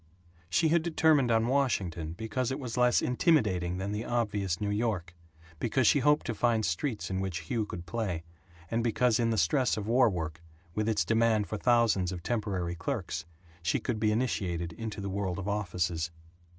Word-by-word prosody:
She 160 - +3
had 170 +1 +4
determined 160 -5 +3
on 115 -1 +3
Washington 95 - 0
because 110 +5 -2
it 135 +2 -3
was 125 -4 -5
less 125 -1 +3
intimidating 105 - +2
than 95 +2 -3
the 105 +2 -2
obvious 105 -7 -1
New 105 -1 -1
York, 105 -5 -1 0.5
because 120 +2 +1
she 145 - +5
hoped 150 +3 +3
to 115 - -1
find 115 -1 +1
streets 105 - -2
in 95 - -1
which 95 -3 -3
Hugh 115 -4 0
could 85 -3 -7
play, 90 -4 -3 0.5
and 115 0 +1
because 120 0 +2
in 115 -1 +2
the 110 - 0
stress 110 - +2
of 105 - -3
war 120 +2 +4
work, 80 -4 -4 0.3
with 105 +3 0
its 105 -7 +1
demand 110 0 +2
for 105 - -4
thousands 115 -7 +3
of 90 -2 -6
temporary 100 -7 -1
clerks, 90 -3 -3 0.4
she 85 - +1
could 120 -4 -2
be 105 0 +2
initiated 90 -8 -1
into 110 +1 -5
the 100 - -4
world 95 -2 -2
of 95 0 -5
offices. 90 -5 -1
105 Hz, 185 wpm, -30 LUFS, 90-120 Hz, 0.5 s, she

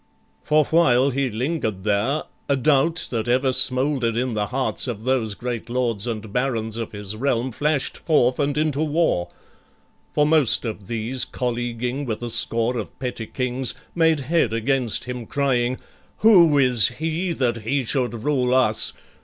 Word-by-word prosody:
For 155 0 +2
while 140 -5 +3
he 135 0 -1
lingered 110 - -3
there, 110 +9 0 0.3
A 140 - +3
doubt 150 +5 +1
that 115 -2 -2
ever 130 +2 +2
smoulder'd 130 -3 +2
in 125 0 -1
the 105 -1 -1
hearts 130 +2 -1
Of 110 -3 -5
those 120 -5 0
great 120 -1 -5
Lords 120 -3 0
and 110 -3 -5
Barons 115 -4 -1
of 115 -2 -4
his 105 0 -5
realm 125 +1 -1
Flash'd 145 +3 -1
forth 130 -6 +2
and 145 0 0
into 150 -1 0
war: 150 - 0 0.8
for 150 - +2
most 150 -6 +3
of 105 -4 -6
these, 120 +3 -2
Colleaguing 120 +2 -3
with 115 0 -4
a 120 - -3
score 115 +2 +1
of 110 - -8
petty 125 -3 -5
kings, 130 0 -1 0.2
Made 160 -3 +2
head 160 -2 +1
against 120 0 0
him, 125 -2 -6
crying, 130 -3 0 0.4
"Who 175 -9 +6
is 125 -5 +4
he 165 +3 -2
That 125 -6 0
he 125 +5 -1
should 120 -1 -2
rule 130 -3 +1
us? 115 -4 +2
125 Hz, 160 wpm, -22 LUFS, 115-140 Hz, 0.8 s, Who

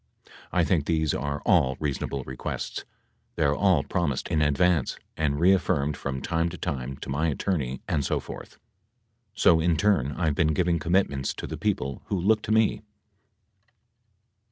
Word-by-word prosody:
I 90 - +2
think 80 -4 +1
these 80 -3 +1
are 70 +1 -3
all 65 0 +3
reasonable 70 -2 -3
requests. 65 0 -5 0.5
They're 70 - +2
all 95 +3 +3
promised 80 -7 -2
in 80 -3 +1
advance 75 0 +2 0.2
and 75 -2 0
reaffirmed 80 -5 +2
from 65 -1 -4
time 85 0 0
to - - -8
time 65 0 -4
to - - -7
my 75 +4 0
attorney 70 -5 -2
and 70 - 0
so - - 0
forth, - - -10 0.8
so 80 - +5
in 80 0 +2
turn 80 -7 +2
I've 80 -3 0
been 80 +1 +1
giving 85 -1 +1
commitments 80 -5 0
to - - -6
the - - -5
people 70 -1 -2
who 100 - -2
look 105 +4 +3
to - - -4
me 110 -1 +5
[Emphasis 105 - -7
added. 110 - -26
80 Hz, 165 wpm, -26 LUFS, 70-90 Hz, 0.8 s, so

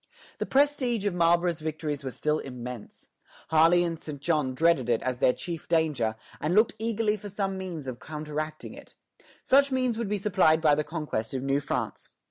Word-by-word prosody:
The - - -2
prestige 265 -6 +2
of 200 - +1
Marlborough's 170 0 +2
victories 155 -2 -4
was 130 -2 -6
still 150 0 +1
immense. 125 -3 -8 0.4
Harley 165 +2 +5
and 165 -2 -3
St. 150 -3 -7
John 145 -4 0
dreaded 160 -5 +2
it 115 - +3
as 125 -1 -2
their 130 - +5
chief 165 +4 -6
danger, 150 -10 +1 0.2
and 160 +4 0
looked 215 +2 +4
eagerly 220 -1 0
for 205 0 -8
some 195 -1 -2
means 180 -6 -6
of 125 -2 -6
counteracting 155 0 -5
it. - - -14 0.5
Such 280 +1 +4
means 255 -3 0
would 230 -4 -2
be 210 - 0
supplied 185 -6 +3
by 155 -2 +4
the 150 +1 +1
conquest 145 -8 -4
of 130 - -2
New 135 +1 +1
France. 145 - -4
160 Hz, 185 wpm, -27 LUFS, 145-195 Hz, 0.5 s, Harley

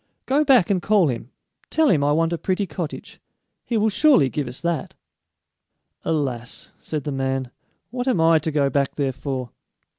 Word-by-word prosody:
Go 285 +3 +2
back 255 - +4
and 185 -3 +1
call 205 -7 +3
him; 120 -1 -5 0.4
tell 320 0 +2
him 150 - +3
I 145 - +2
want 165 +2 +1
a - - -1
pretty 190 +2 -1
cottage; 165 -2 -7 0.4
he 235 - -1
will 215 0 +2
surely 205 - +4
give 145 -4 -2
us 125 +1 -6
that!" 170 +2 -2 1.1
"Alas," 130 -6 -3
said 150 -3 -4
the 145 - -3
man, 135 -2 -2 0.4
"what 245 +1 -3
am 250 -10 +2
I 165 0 +5
to 155 - -2
go 145 -2 +2
back 140 0 0
there 135 -3 -1
for?" 130 -2 -5
155 Hz, 180 wpm, -22 LUFS, 135-200 Hz, 1.1 s, I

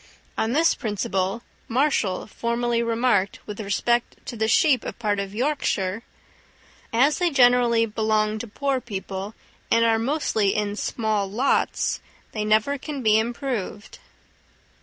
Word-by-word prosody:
On 225 +2 0
this 325 +3 +4
principle 205 0 -2 0.2
Marshall 235 -7 +1
formerly 235 +1 -1
remarked, 230 -4 +1
with 210 0 -7
respect 235 +3 0
to 245 - -6
the 220 0 0
sheep 260 +1 +4
of - - -6
part 210 -3 -1
of 200 0 -5
Yorkshire, 225 -7 -1 0.9
"As 270 +7 +3
they 355 -1 +2
generally 245 -4 +4
belong 215 -1 0
to 235 - -6
poor 270 +4 -1
people, 195 -1 -6 0.3
and 230 0 +4
are 225 -1 +3
mostly 225 -6 0
in 205 -1 -1
small 215 -2 -1
lots, 245 +8 0 0.3
they 215 - -3
never 215 +7 +2
can 285 -2 -6
be 215 0 +5
improved." 235 -3 -4
225 Hz, 135 wpm, -24 LUFS, 210-245 Hz, 0.9 s, be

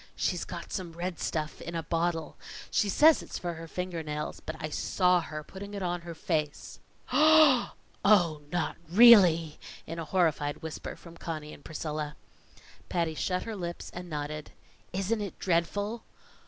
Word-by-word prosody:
"She's - - -1
got - - -7
some 180 -4 -4
red 175 +1 -4
stuff 155 -1 -3
in 170 - -6
a 165 - -2
bottle. 165 -1 -1 0.4
She 205 - +2
says 310 +9 +6
it's - - -6
for 175 -1 -3
her 165 0 -8
finger 180 0 -4
nails, 150 -1 -4
but 155 - -6
I 155 - -3
saw 180 +3 +2
her 155 -1 -6
putting 200 +5 -9
it 200 - -4
on 175 -1 -1
her 170 -1 -8
face." 155 -2 -3 0.3
"Oh! 310 -4 +6 0.8
not 175 -2 -1
really?" 180 -7 +7 0.3
in 165 +1 -6
a 165 - -4
horrified 155 -5 0
whisper 160 -1 -6
from 170 -1 -14
Conny 155 -3 -5
and 145 - -14
Priscilla. 150 -1 -4 0.7
Patty 170 -2 0
shut 180 +3 -1
her 225 - -5
lips 175 -3 -5
and 175 0 -7
nodded. 150 0 -4 0.4
"Isn't 195 +4 -1
it 200 -3 -5
dreadful?" 200 +6 0
170 Hz, 160 wpm, -29 LUFS, 155-190 Hz, 0.8 s, really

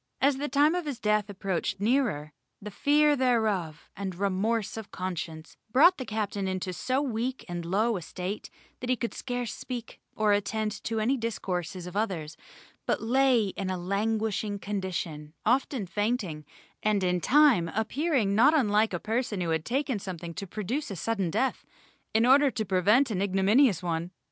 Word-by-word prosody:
As 275 0 +3
the 290 +2 -3
time 290 +4 +4
of 355 -3 -2
his 280 -4 -3
death 210 -1 +1
approached 195 -1 -2
nearer, 210 - 0 0.3
the 210 +1 -8
fear 295 +6 +3
thereof, 215 - 0
and 190 -2 -4
remorse 200 +3 0
of 220 -2 -7
conscience, 165 -3 -5
brought 320 +9 +6
the 255 - -5
captain 205 -2 -2
into 185 0 -3
so 260 +9 0
weak 250 0 -3
and 175 -1 -4
low 210 +6 +1
a - - -6
state 185 +5 -5 0.3
that 250 - -5
he 255 - +4
could 235 0 -4
scarce 245 -3 -3
speak 245 -3 -7 0.2
or 215 -1 +3
attend 210 +1 -1
to 225 -1 -1
any 250 +6 +1
discourses 185 -6 -3
of 180 +1 -8
others, 175 -8 -2 0.5
but - - +1
lay 245 -3 +3
in 190 0 -4
a 185 - -1
languishing 210 +2 -1
condition, 180 -6 -4
often 250 -1 +1
fainting, 195 - -2 0.4
and 210 -2 +1
in 180 -1 +1
fine 275 - +5
appearing 225 - 0
not 255 +9 +5
unlike 215 -5 +2
a 175 - -1
person 225 -1 -2
who 170 -2 -1
had 160 -1 0
taken 265 -2 -1
something 175 -3 -6
to 195 - -6
produce 225 - -3
a 195 - -5
sudden 195 0 -1
death, 260 +11 0 0.5
in 225 +2 +3
order 275 +3 +6
to 220 -4 -3
prevent 205 +8 +3
an 190 -3 -1
ignominious 195 - +3
one. 170 0 -2
210 Hz, 170 wpm, -28 LUFS, 185-245 Hz, 0.5 s, brought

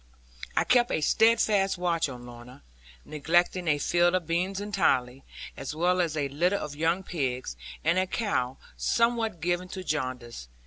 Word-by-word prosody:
I - - +4
kept 245 -1 +3
a - - 0
steadfast 205 +2 +3
watch 170 -4 0
on 125 -2 -9
Lorna, 120 - -12 0.4
neglecting 175 +4 +1
a 150 -2 +3
field 175 +4 +2
of 180 -2 -1
beans 180 +4 -1
entirely, 135 -11 0 0.3
as 145 - -6
well 180 +3 +2
as 160 -3 -1
a 145 -2 0
litter 175 +8 +1
of 150 -6 -4
young 165 +5 0
pigs, 130 - -3 0.3
and 185 - +3
a 185 - 0
cow 135 - -1 0.2
somewhat 230 -6 0
given 175 +2 -1
to 185 0 -7
jaundice. 130 - -4
170 Hz, 155 wpm, -27 LUFS, 140-185 Hz, 0.4 s, I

